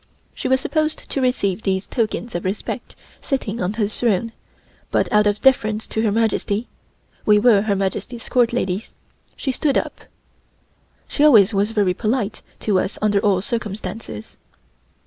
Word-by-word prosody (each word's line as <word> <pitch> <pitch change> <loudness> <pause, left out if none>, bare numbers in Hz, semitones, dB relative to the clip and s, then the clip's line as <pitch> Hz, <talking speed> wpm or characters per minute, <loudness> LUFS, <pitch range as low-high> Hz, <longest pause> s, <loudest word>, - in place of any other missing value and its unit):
She - - -4
was 260 0 +3
supposed 310 +2 -2
to 275 - -1
receive 220 -6 0
these 190 -1 -1
tokens 230 0 -2
of 175 - -3
respect 190 +3 -4 0.3
sitting 235 -5 -2
on 180 +3 -1
her 210 -2 0
throne, 225 0 0 0.6
but - - +1
out 210 0 +5
of 205 0 0
deference 220 -5 +3
to 220 - -2
Her 220 -2 +2
Majesty 220 0 0 0.6
(we 210 -1 +5
were 210 -2 +5
Her 205 -1 0
Majesty's 195 +5 -3
Court 245 -2 +3
ladies) 200 -3 -2 0.4
she 270 - -2
stood 275 +2 +1
up. - - -4 1.0
She 295 - 0
always 225 -8 +7
was 200 +2 +1
very 205 -5 +2
polite 215 +1 -1 0.2
to 200 -3 +2
us 190 - -2
under 210 -1 +2
all 195 -2 +2
circumstances. 210 - -5
215 Hz, 155 wpm, -21 LUFS, 200-240 Hz, 1.0 s, always